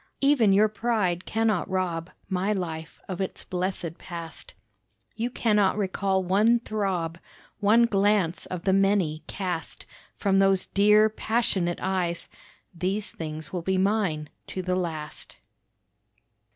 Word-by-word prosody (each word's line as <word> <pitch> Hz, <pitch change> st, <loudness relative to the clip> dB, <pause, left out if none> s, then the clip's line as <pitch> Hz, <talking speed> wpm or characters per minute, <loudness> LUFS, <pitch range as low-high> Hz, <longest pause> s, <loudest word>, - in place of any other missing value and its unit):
Even 275 Hz, -7 st, +4 dB
your 205 Hz, +2 st, +5 dB
pride 210 Hz, -5 st, -1 dB
cannot 220 Hz, -4 st, +1 dB
rob 180 Hz, -3 st, -1 dB, 0.2 s
My 190 Hz, +2 st, 0 dB
life 165 Hz, -4 st, -5 dB
of 190 Hz, 0 st, -4 dB
its 190 Hz, -, -4 dB
blessed 180 Hz, -2 st, -3 dB
past; 170 Hz, -2 st, -8 dB, 0.6 s
You 230 Hz, +2 st, -1 dB
cannot 210 Hz, -5 st, +2 dB
recall 190 Hz, -1 st, 0 dB
one 210 Hz, +6 st, +4 dB
throb, 190 Hz, -7 st, -2 dB, 0.4 s
One 220 Hz, +3 st, +5 dB
glance 200 Hz, -5 st, +1 dB
of 180 Hz, -1 st, -5 dB
the 190 Hz, -, +2 dB
many 195 Hz, -5 st, +2 dB
cast 180 Hz, -4 st, -4 dB, 0.3 s
From 195 Hz, -2 st, +2 dB
those 195 Hz, -1 st, +3 dB
dear, 210 Hz, +2 st, +5 dB
passionate 215 Hz, -5 st, 0 dB
eyes; 180 Hz, -2 st, -1 dB, 0.4 s
These 190 Hz, +4 st, -2 dB
things 155 Hz, 0 st, -6 dB
will 180 Hz, -, -2 dB
be 190 Hz, +2 st, 0 dB
mine 190 Hz, -6 st, +1 dB, 0.2 s
to 185 Hz, -, -4 dB
the 180 Hz, 0 st, 0 dB
last. 160 Hz, -4 st, -4 dB
190 Hz, 125 wpm, -26 LUFS, 175-210 Hz, 0.6 s, your